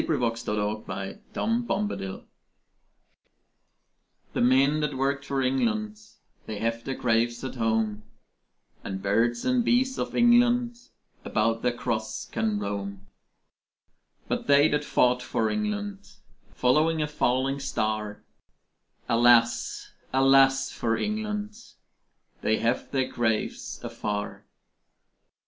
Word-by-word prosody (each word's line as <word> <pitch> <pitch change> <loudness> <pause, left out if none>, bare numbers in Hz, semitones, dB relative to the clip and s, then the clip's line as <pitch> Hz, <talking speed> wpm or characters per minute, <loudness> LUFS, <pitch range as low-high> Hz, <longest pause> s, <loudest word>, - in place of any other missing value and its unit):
ELEGY 160 - 0
IN 125 - -2 0.3
A 105 -2 -3 0.2
COUNTRY 230 +2 0
CHURCHYARD 195 - -3 2.1
The - - -1
men 135 +5 +4
that 150 -3 -2
worked 140 +1 0
for 135 -1 -1
England 215 - 0 0.5
They 110 - -4
have 115 +2 -2
their 135 - -3
graves 120 0 0
at 130 - -4
home: 110 -3 0 0.8
And 95 0 -5
bees 115 +4 +1
and 255 -1 +2
birds 260 +3 +1
of - - -3
England 240 0 +4 0.4
About 115 +1 0
the 125 - +2
cross 110 -2 -3
can 220 -2 -1
roam. 100 - -4 1.2
But - - -2
they 145 +1 +6
that 150 0 0
fought 125 -3 +2
for 115 -2 -1
England, 205 -2 -3 0.4
Following 155 +5 +2
a - - -2
falling 135 -1 0
star, 110 -6 -2 0.8
Alas, 120 0 +3 0.2
alas 135 0 +4
for 115 -1 -1
England 210 - -3 0.9
They 110 - +2
have 120 +2 -1
their 130 -2 0
graves 110 -2 -2
afar. 105 -1 -4
130 Hz, 110 wpm, -26 LUFS, -, 2.1 s, they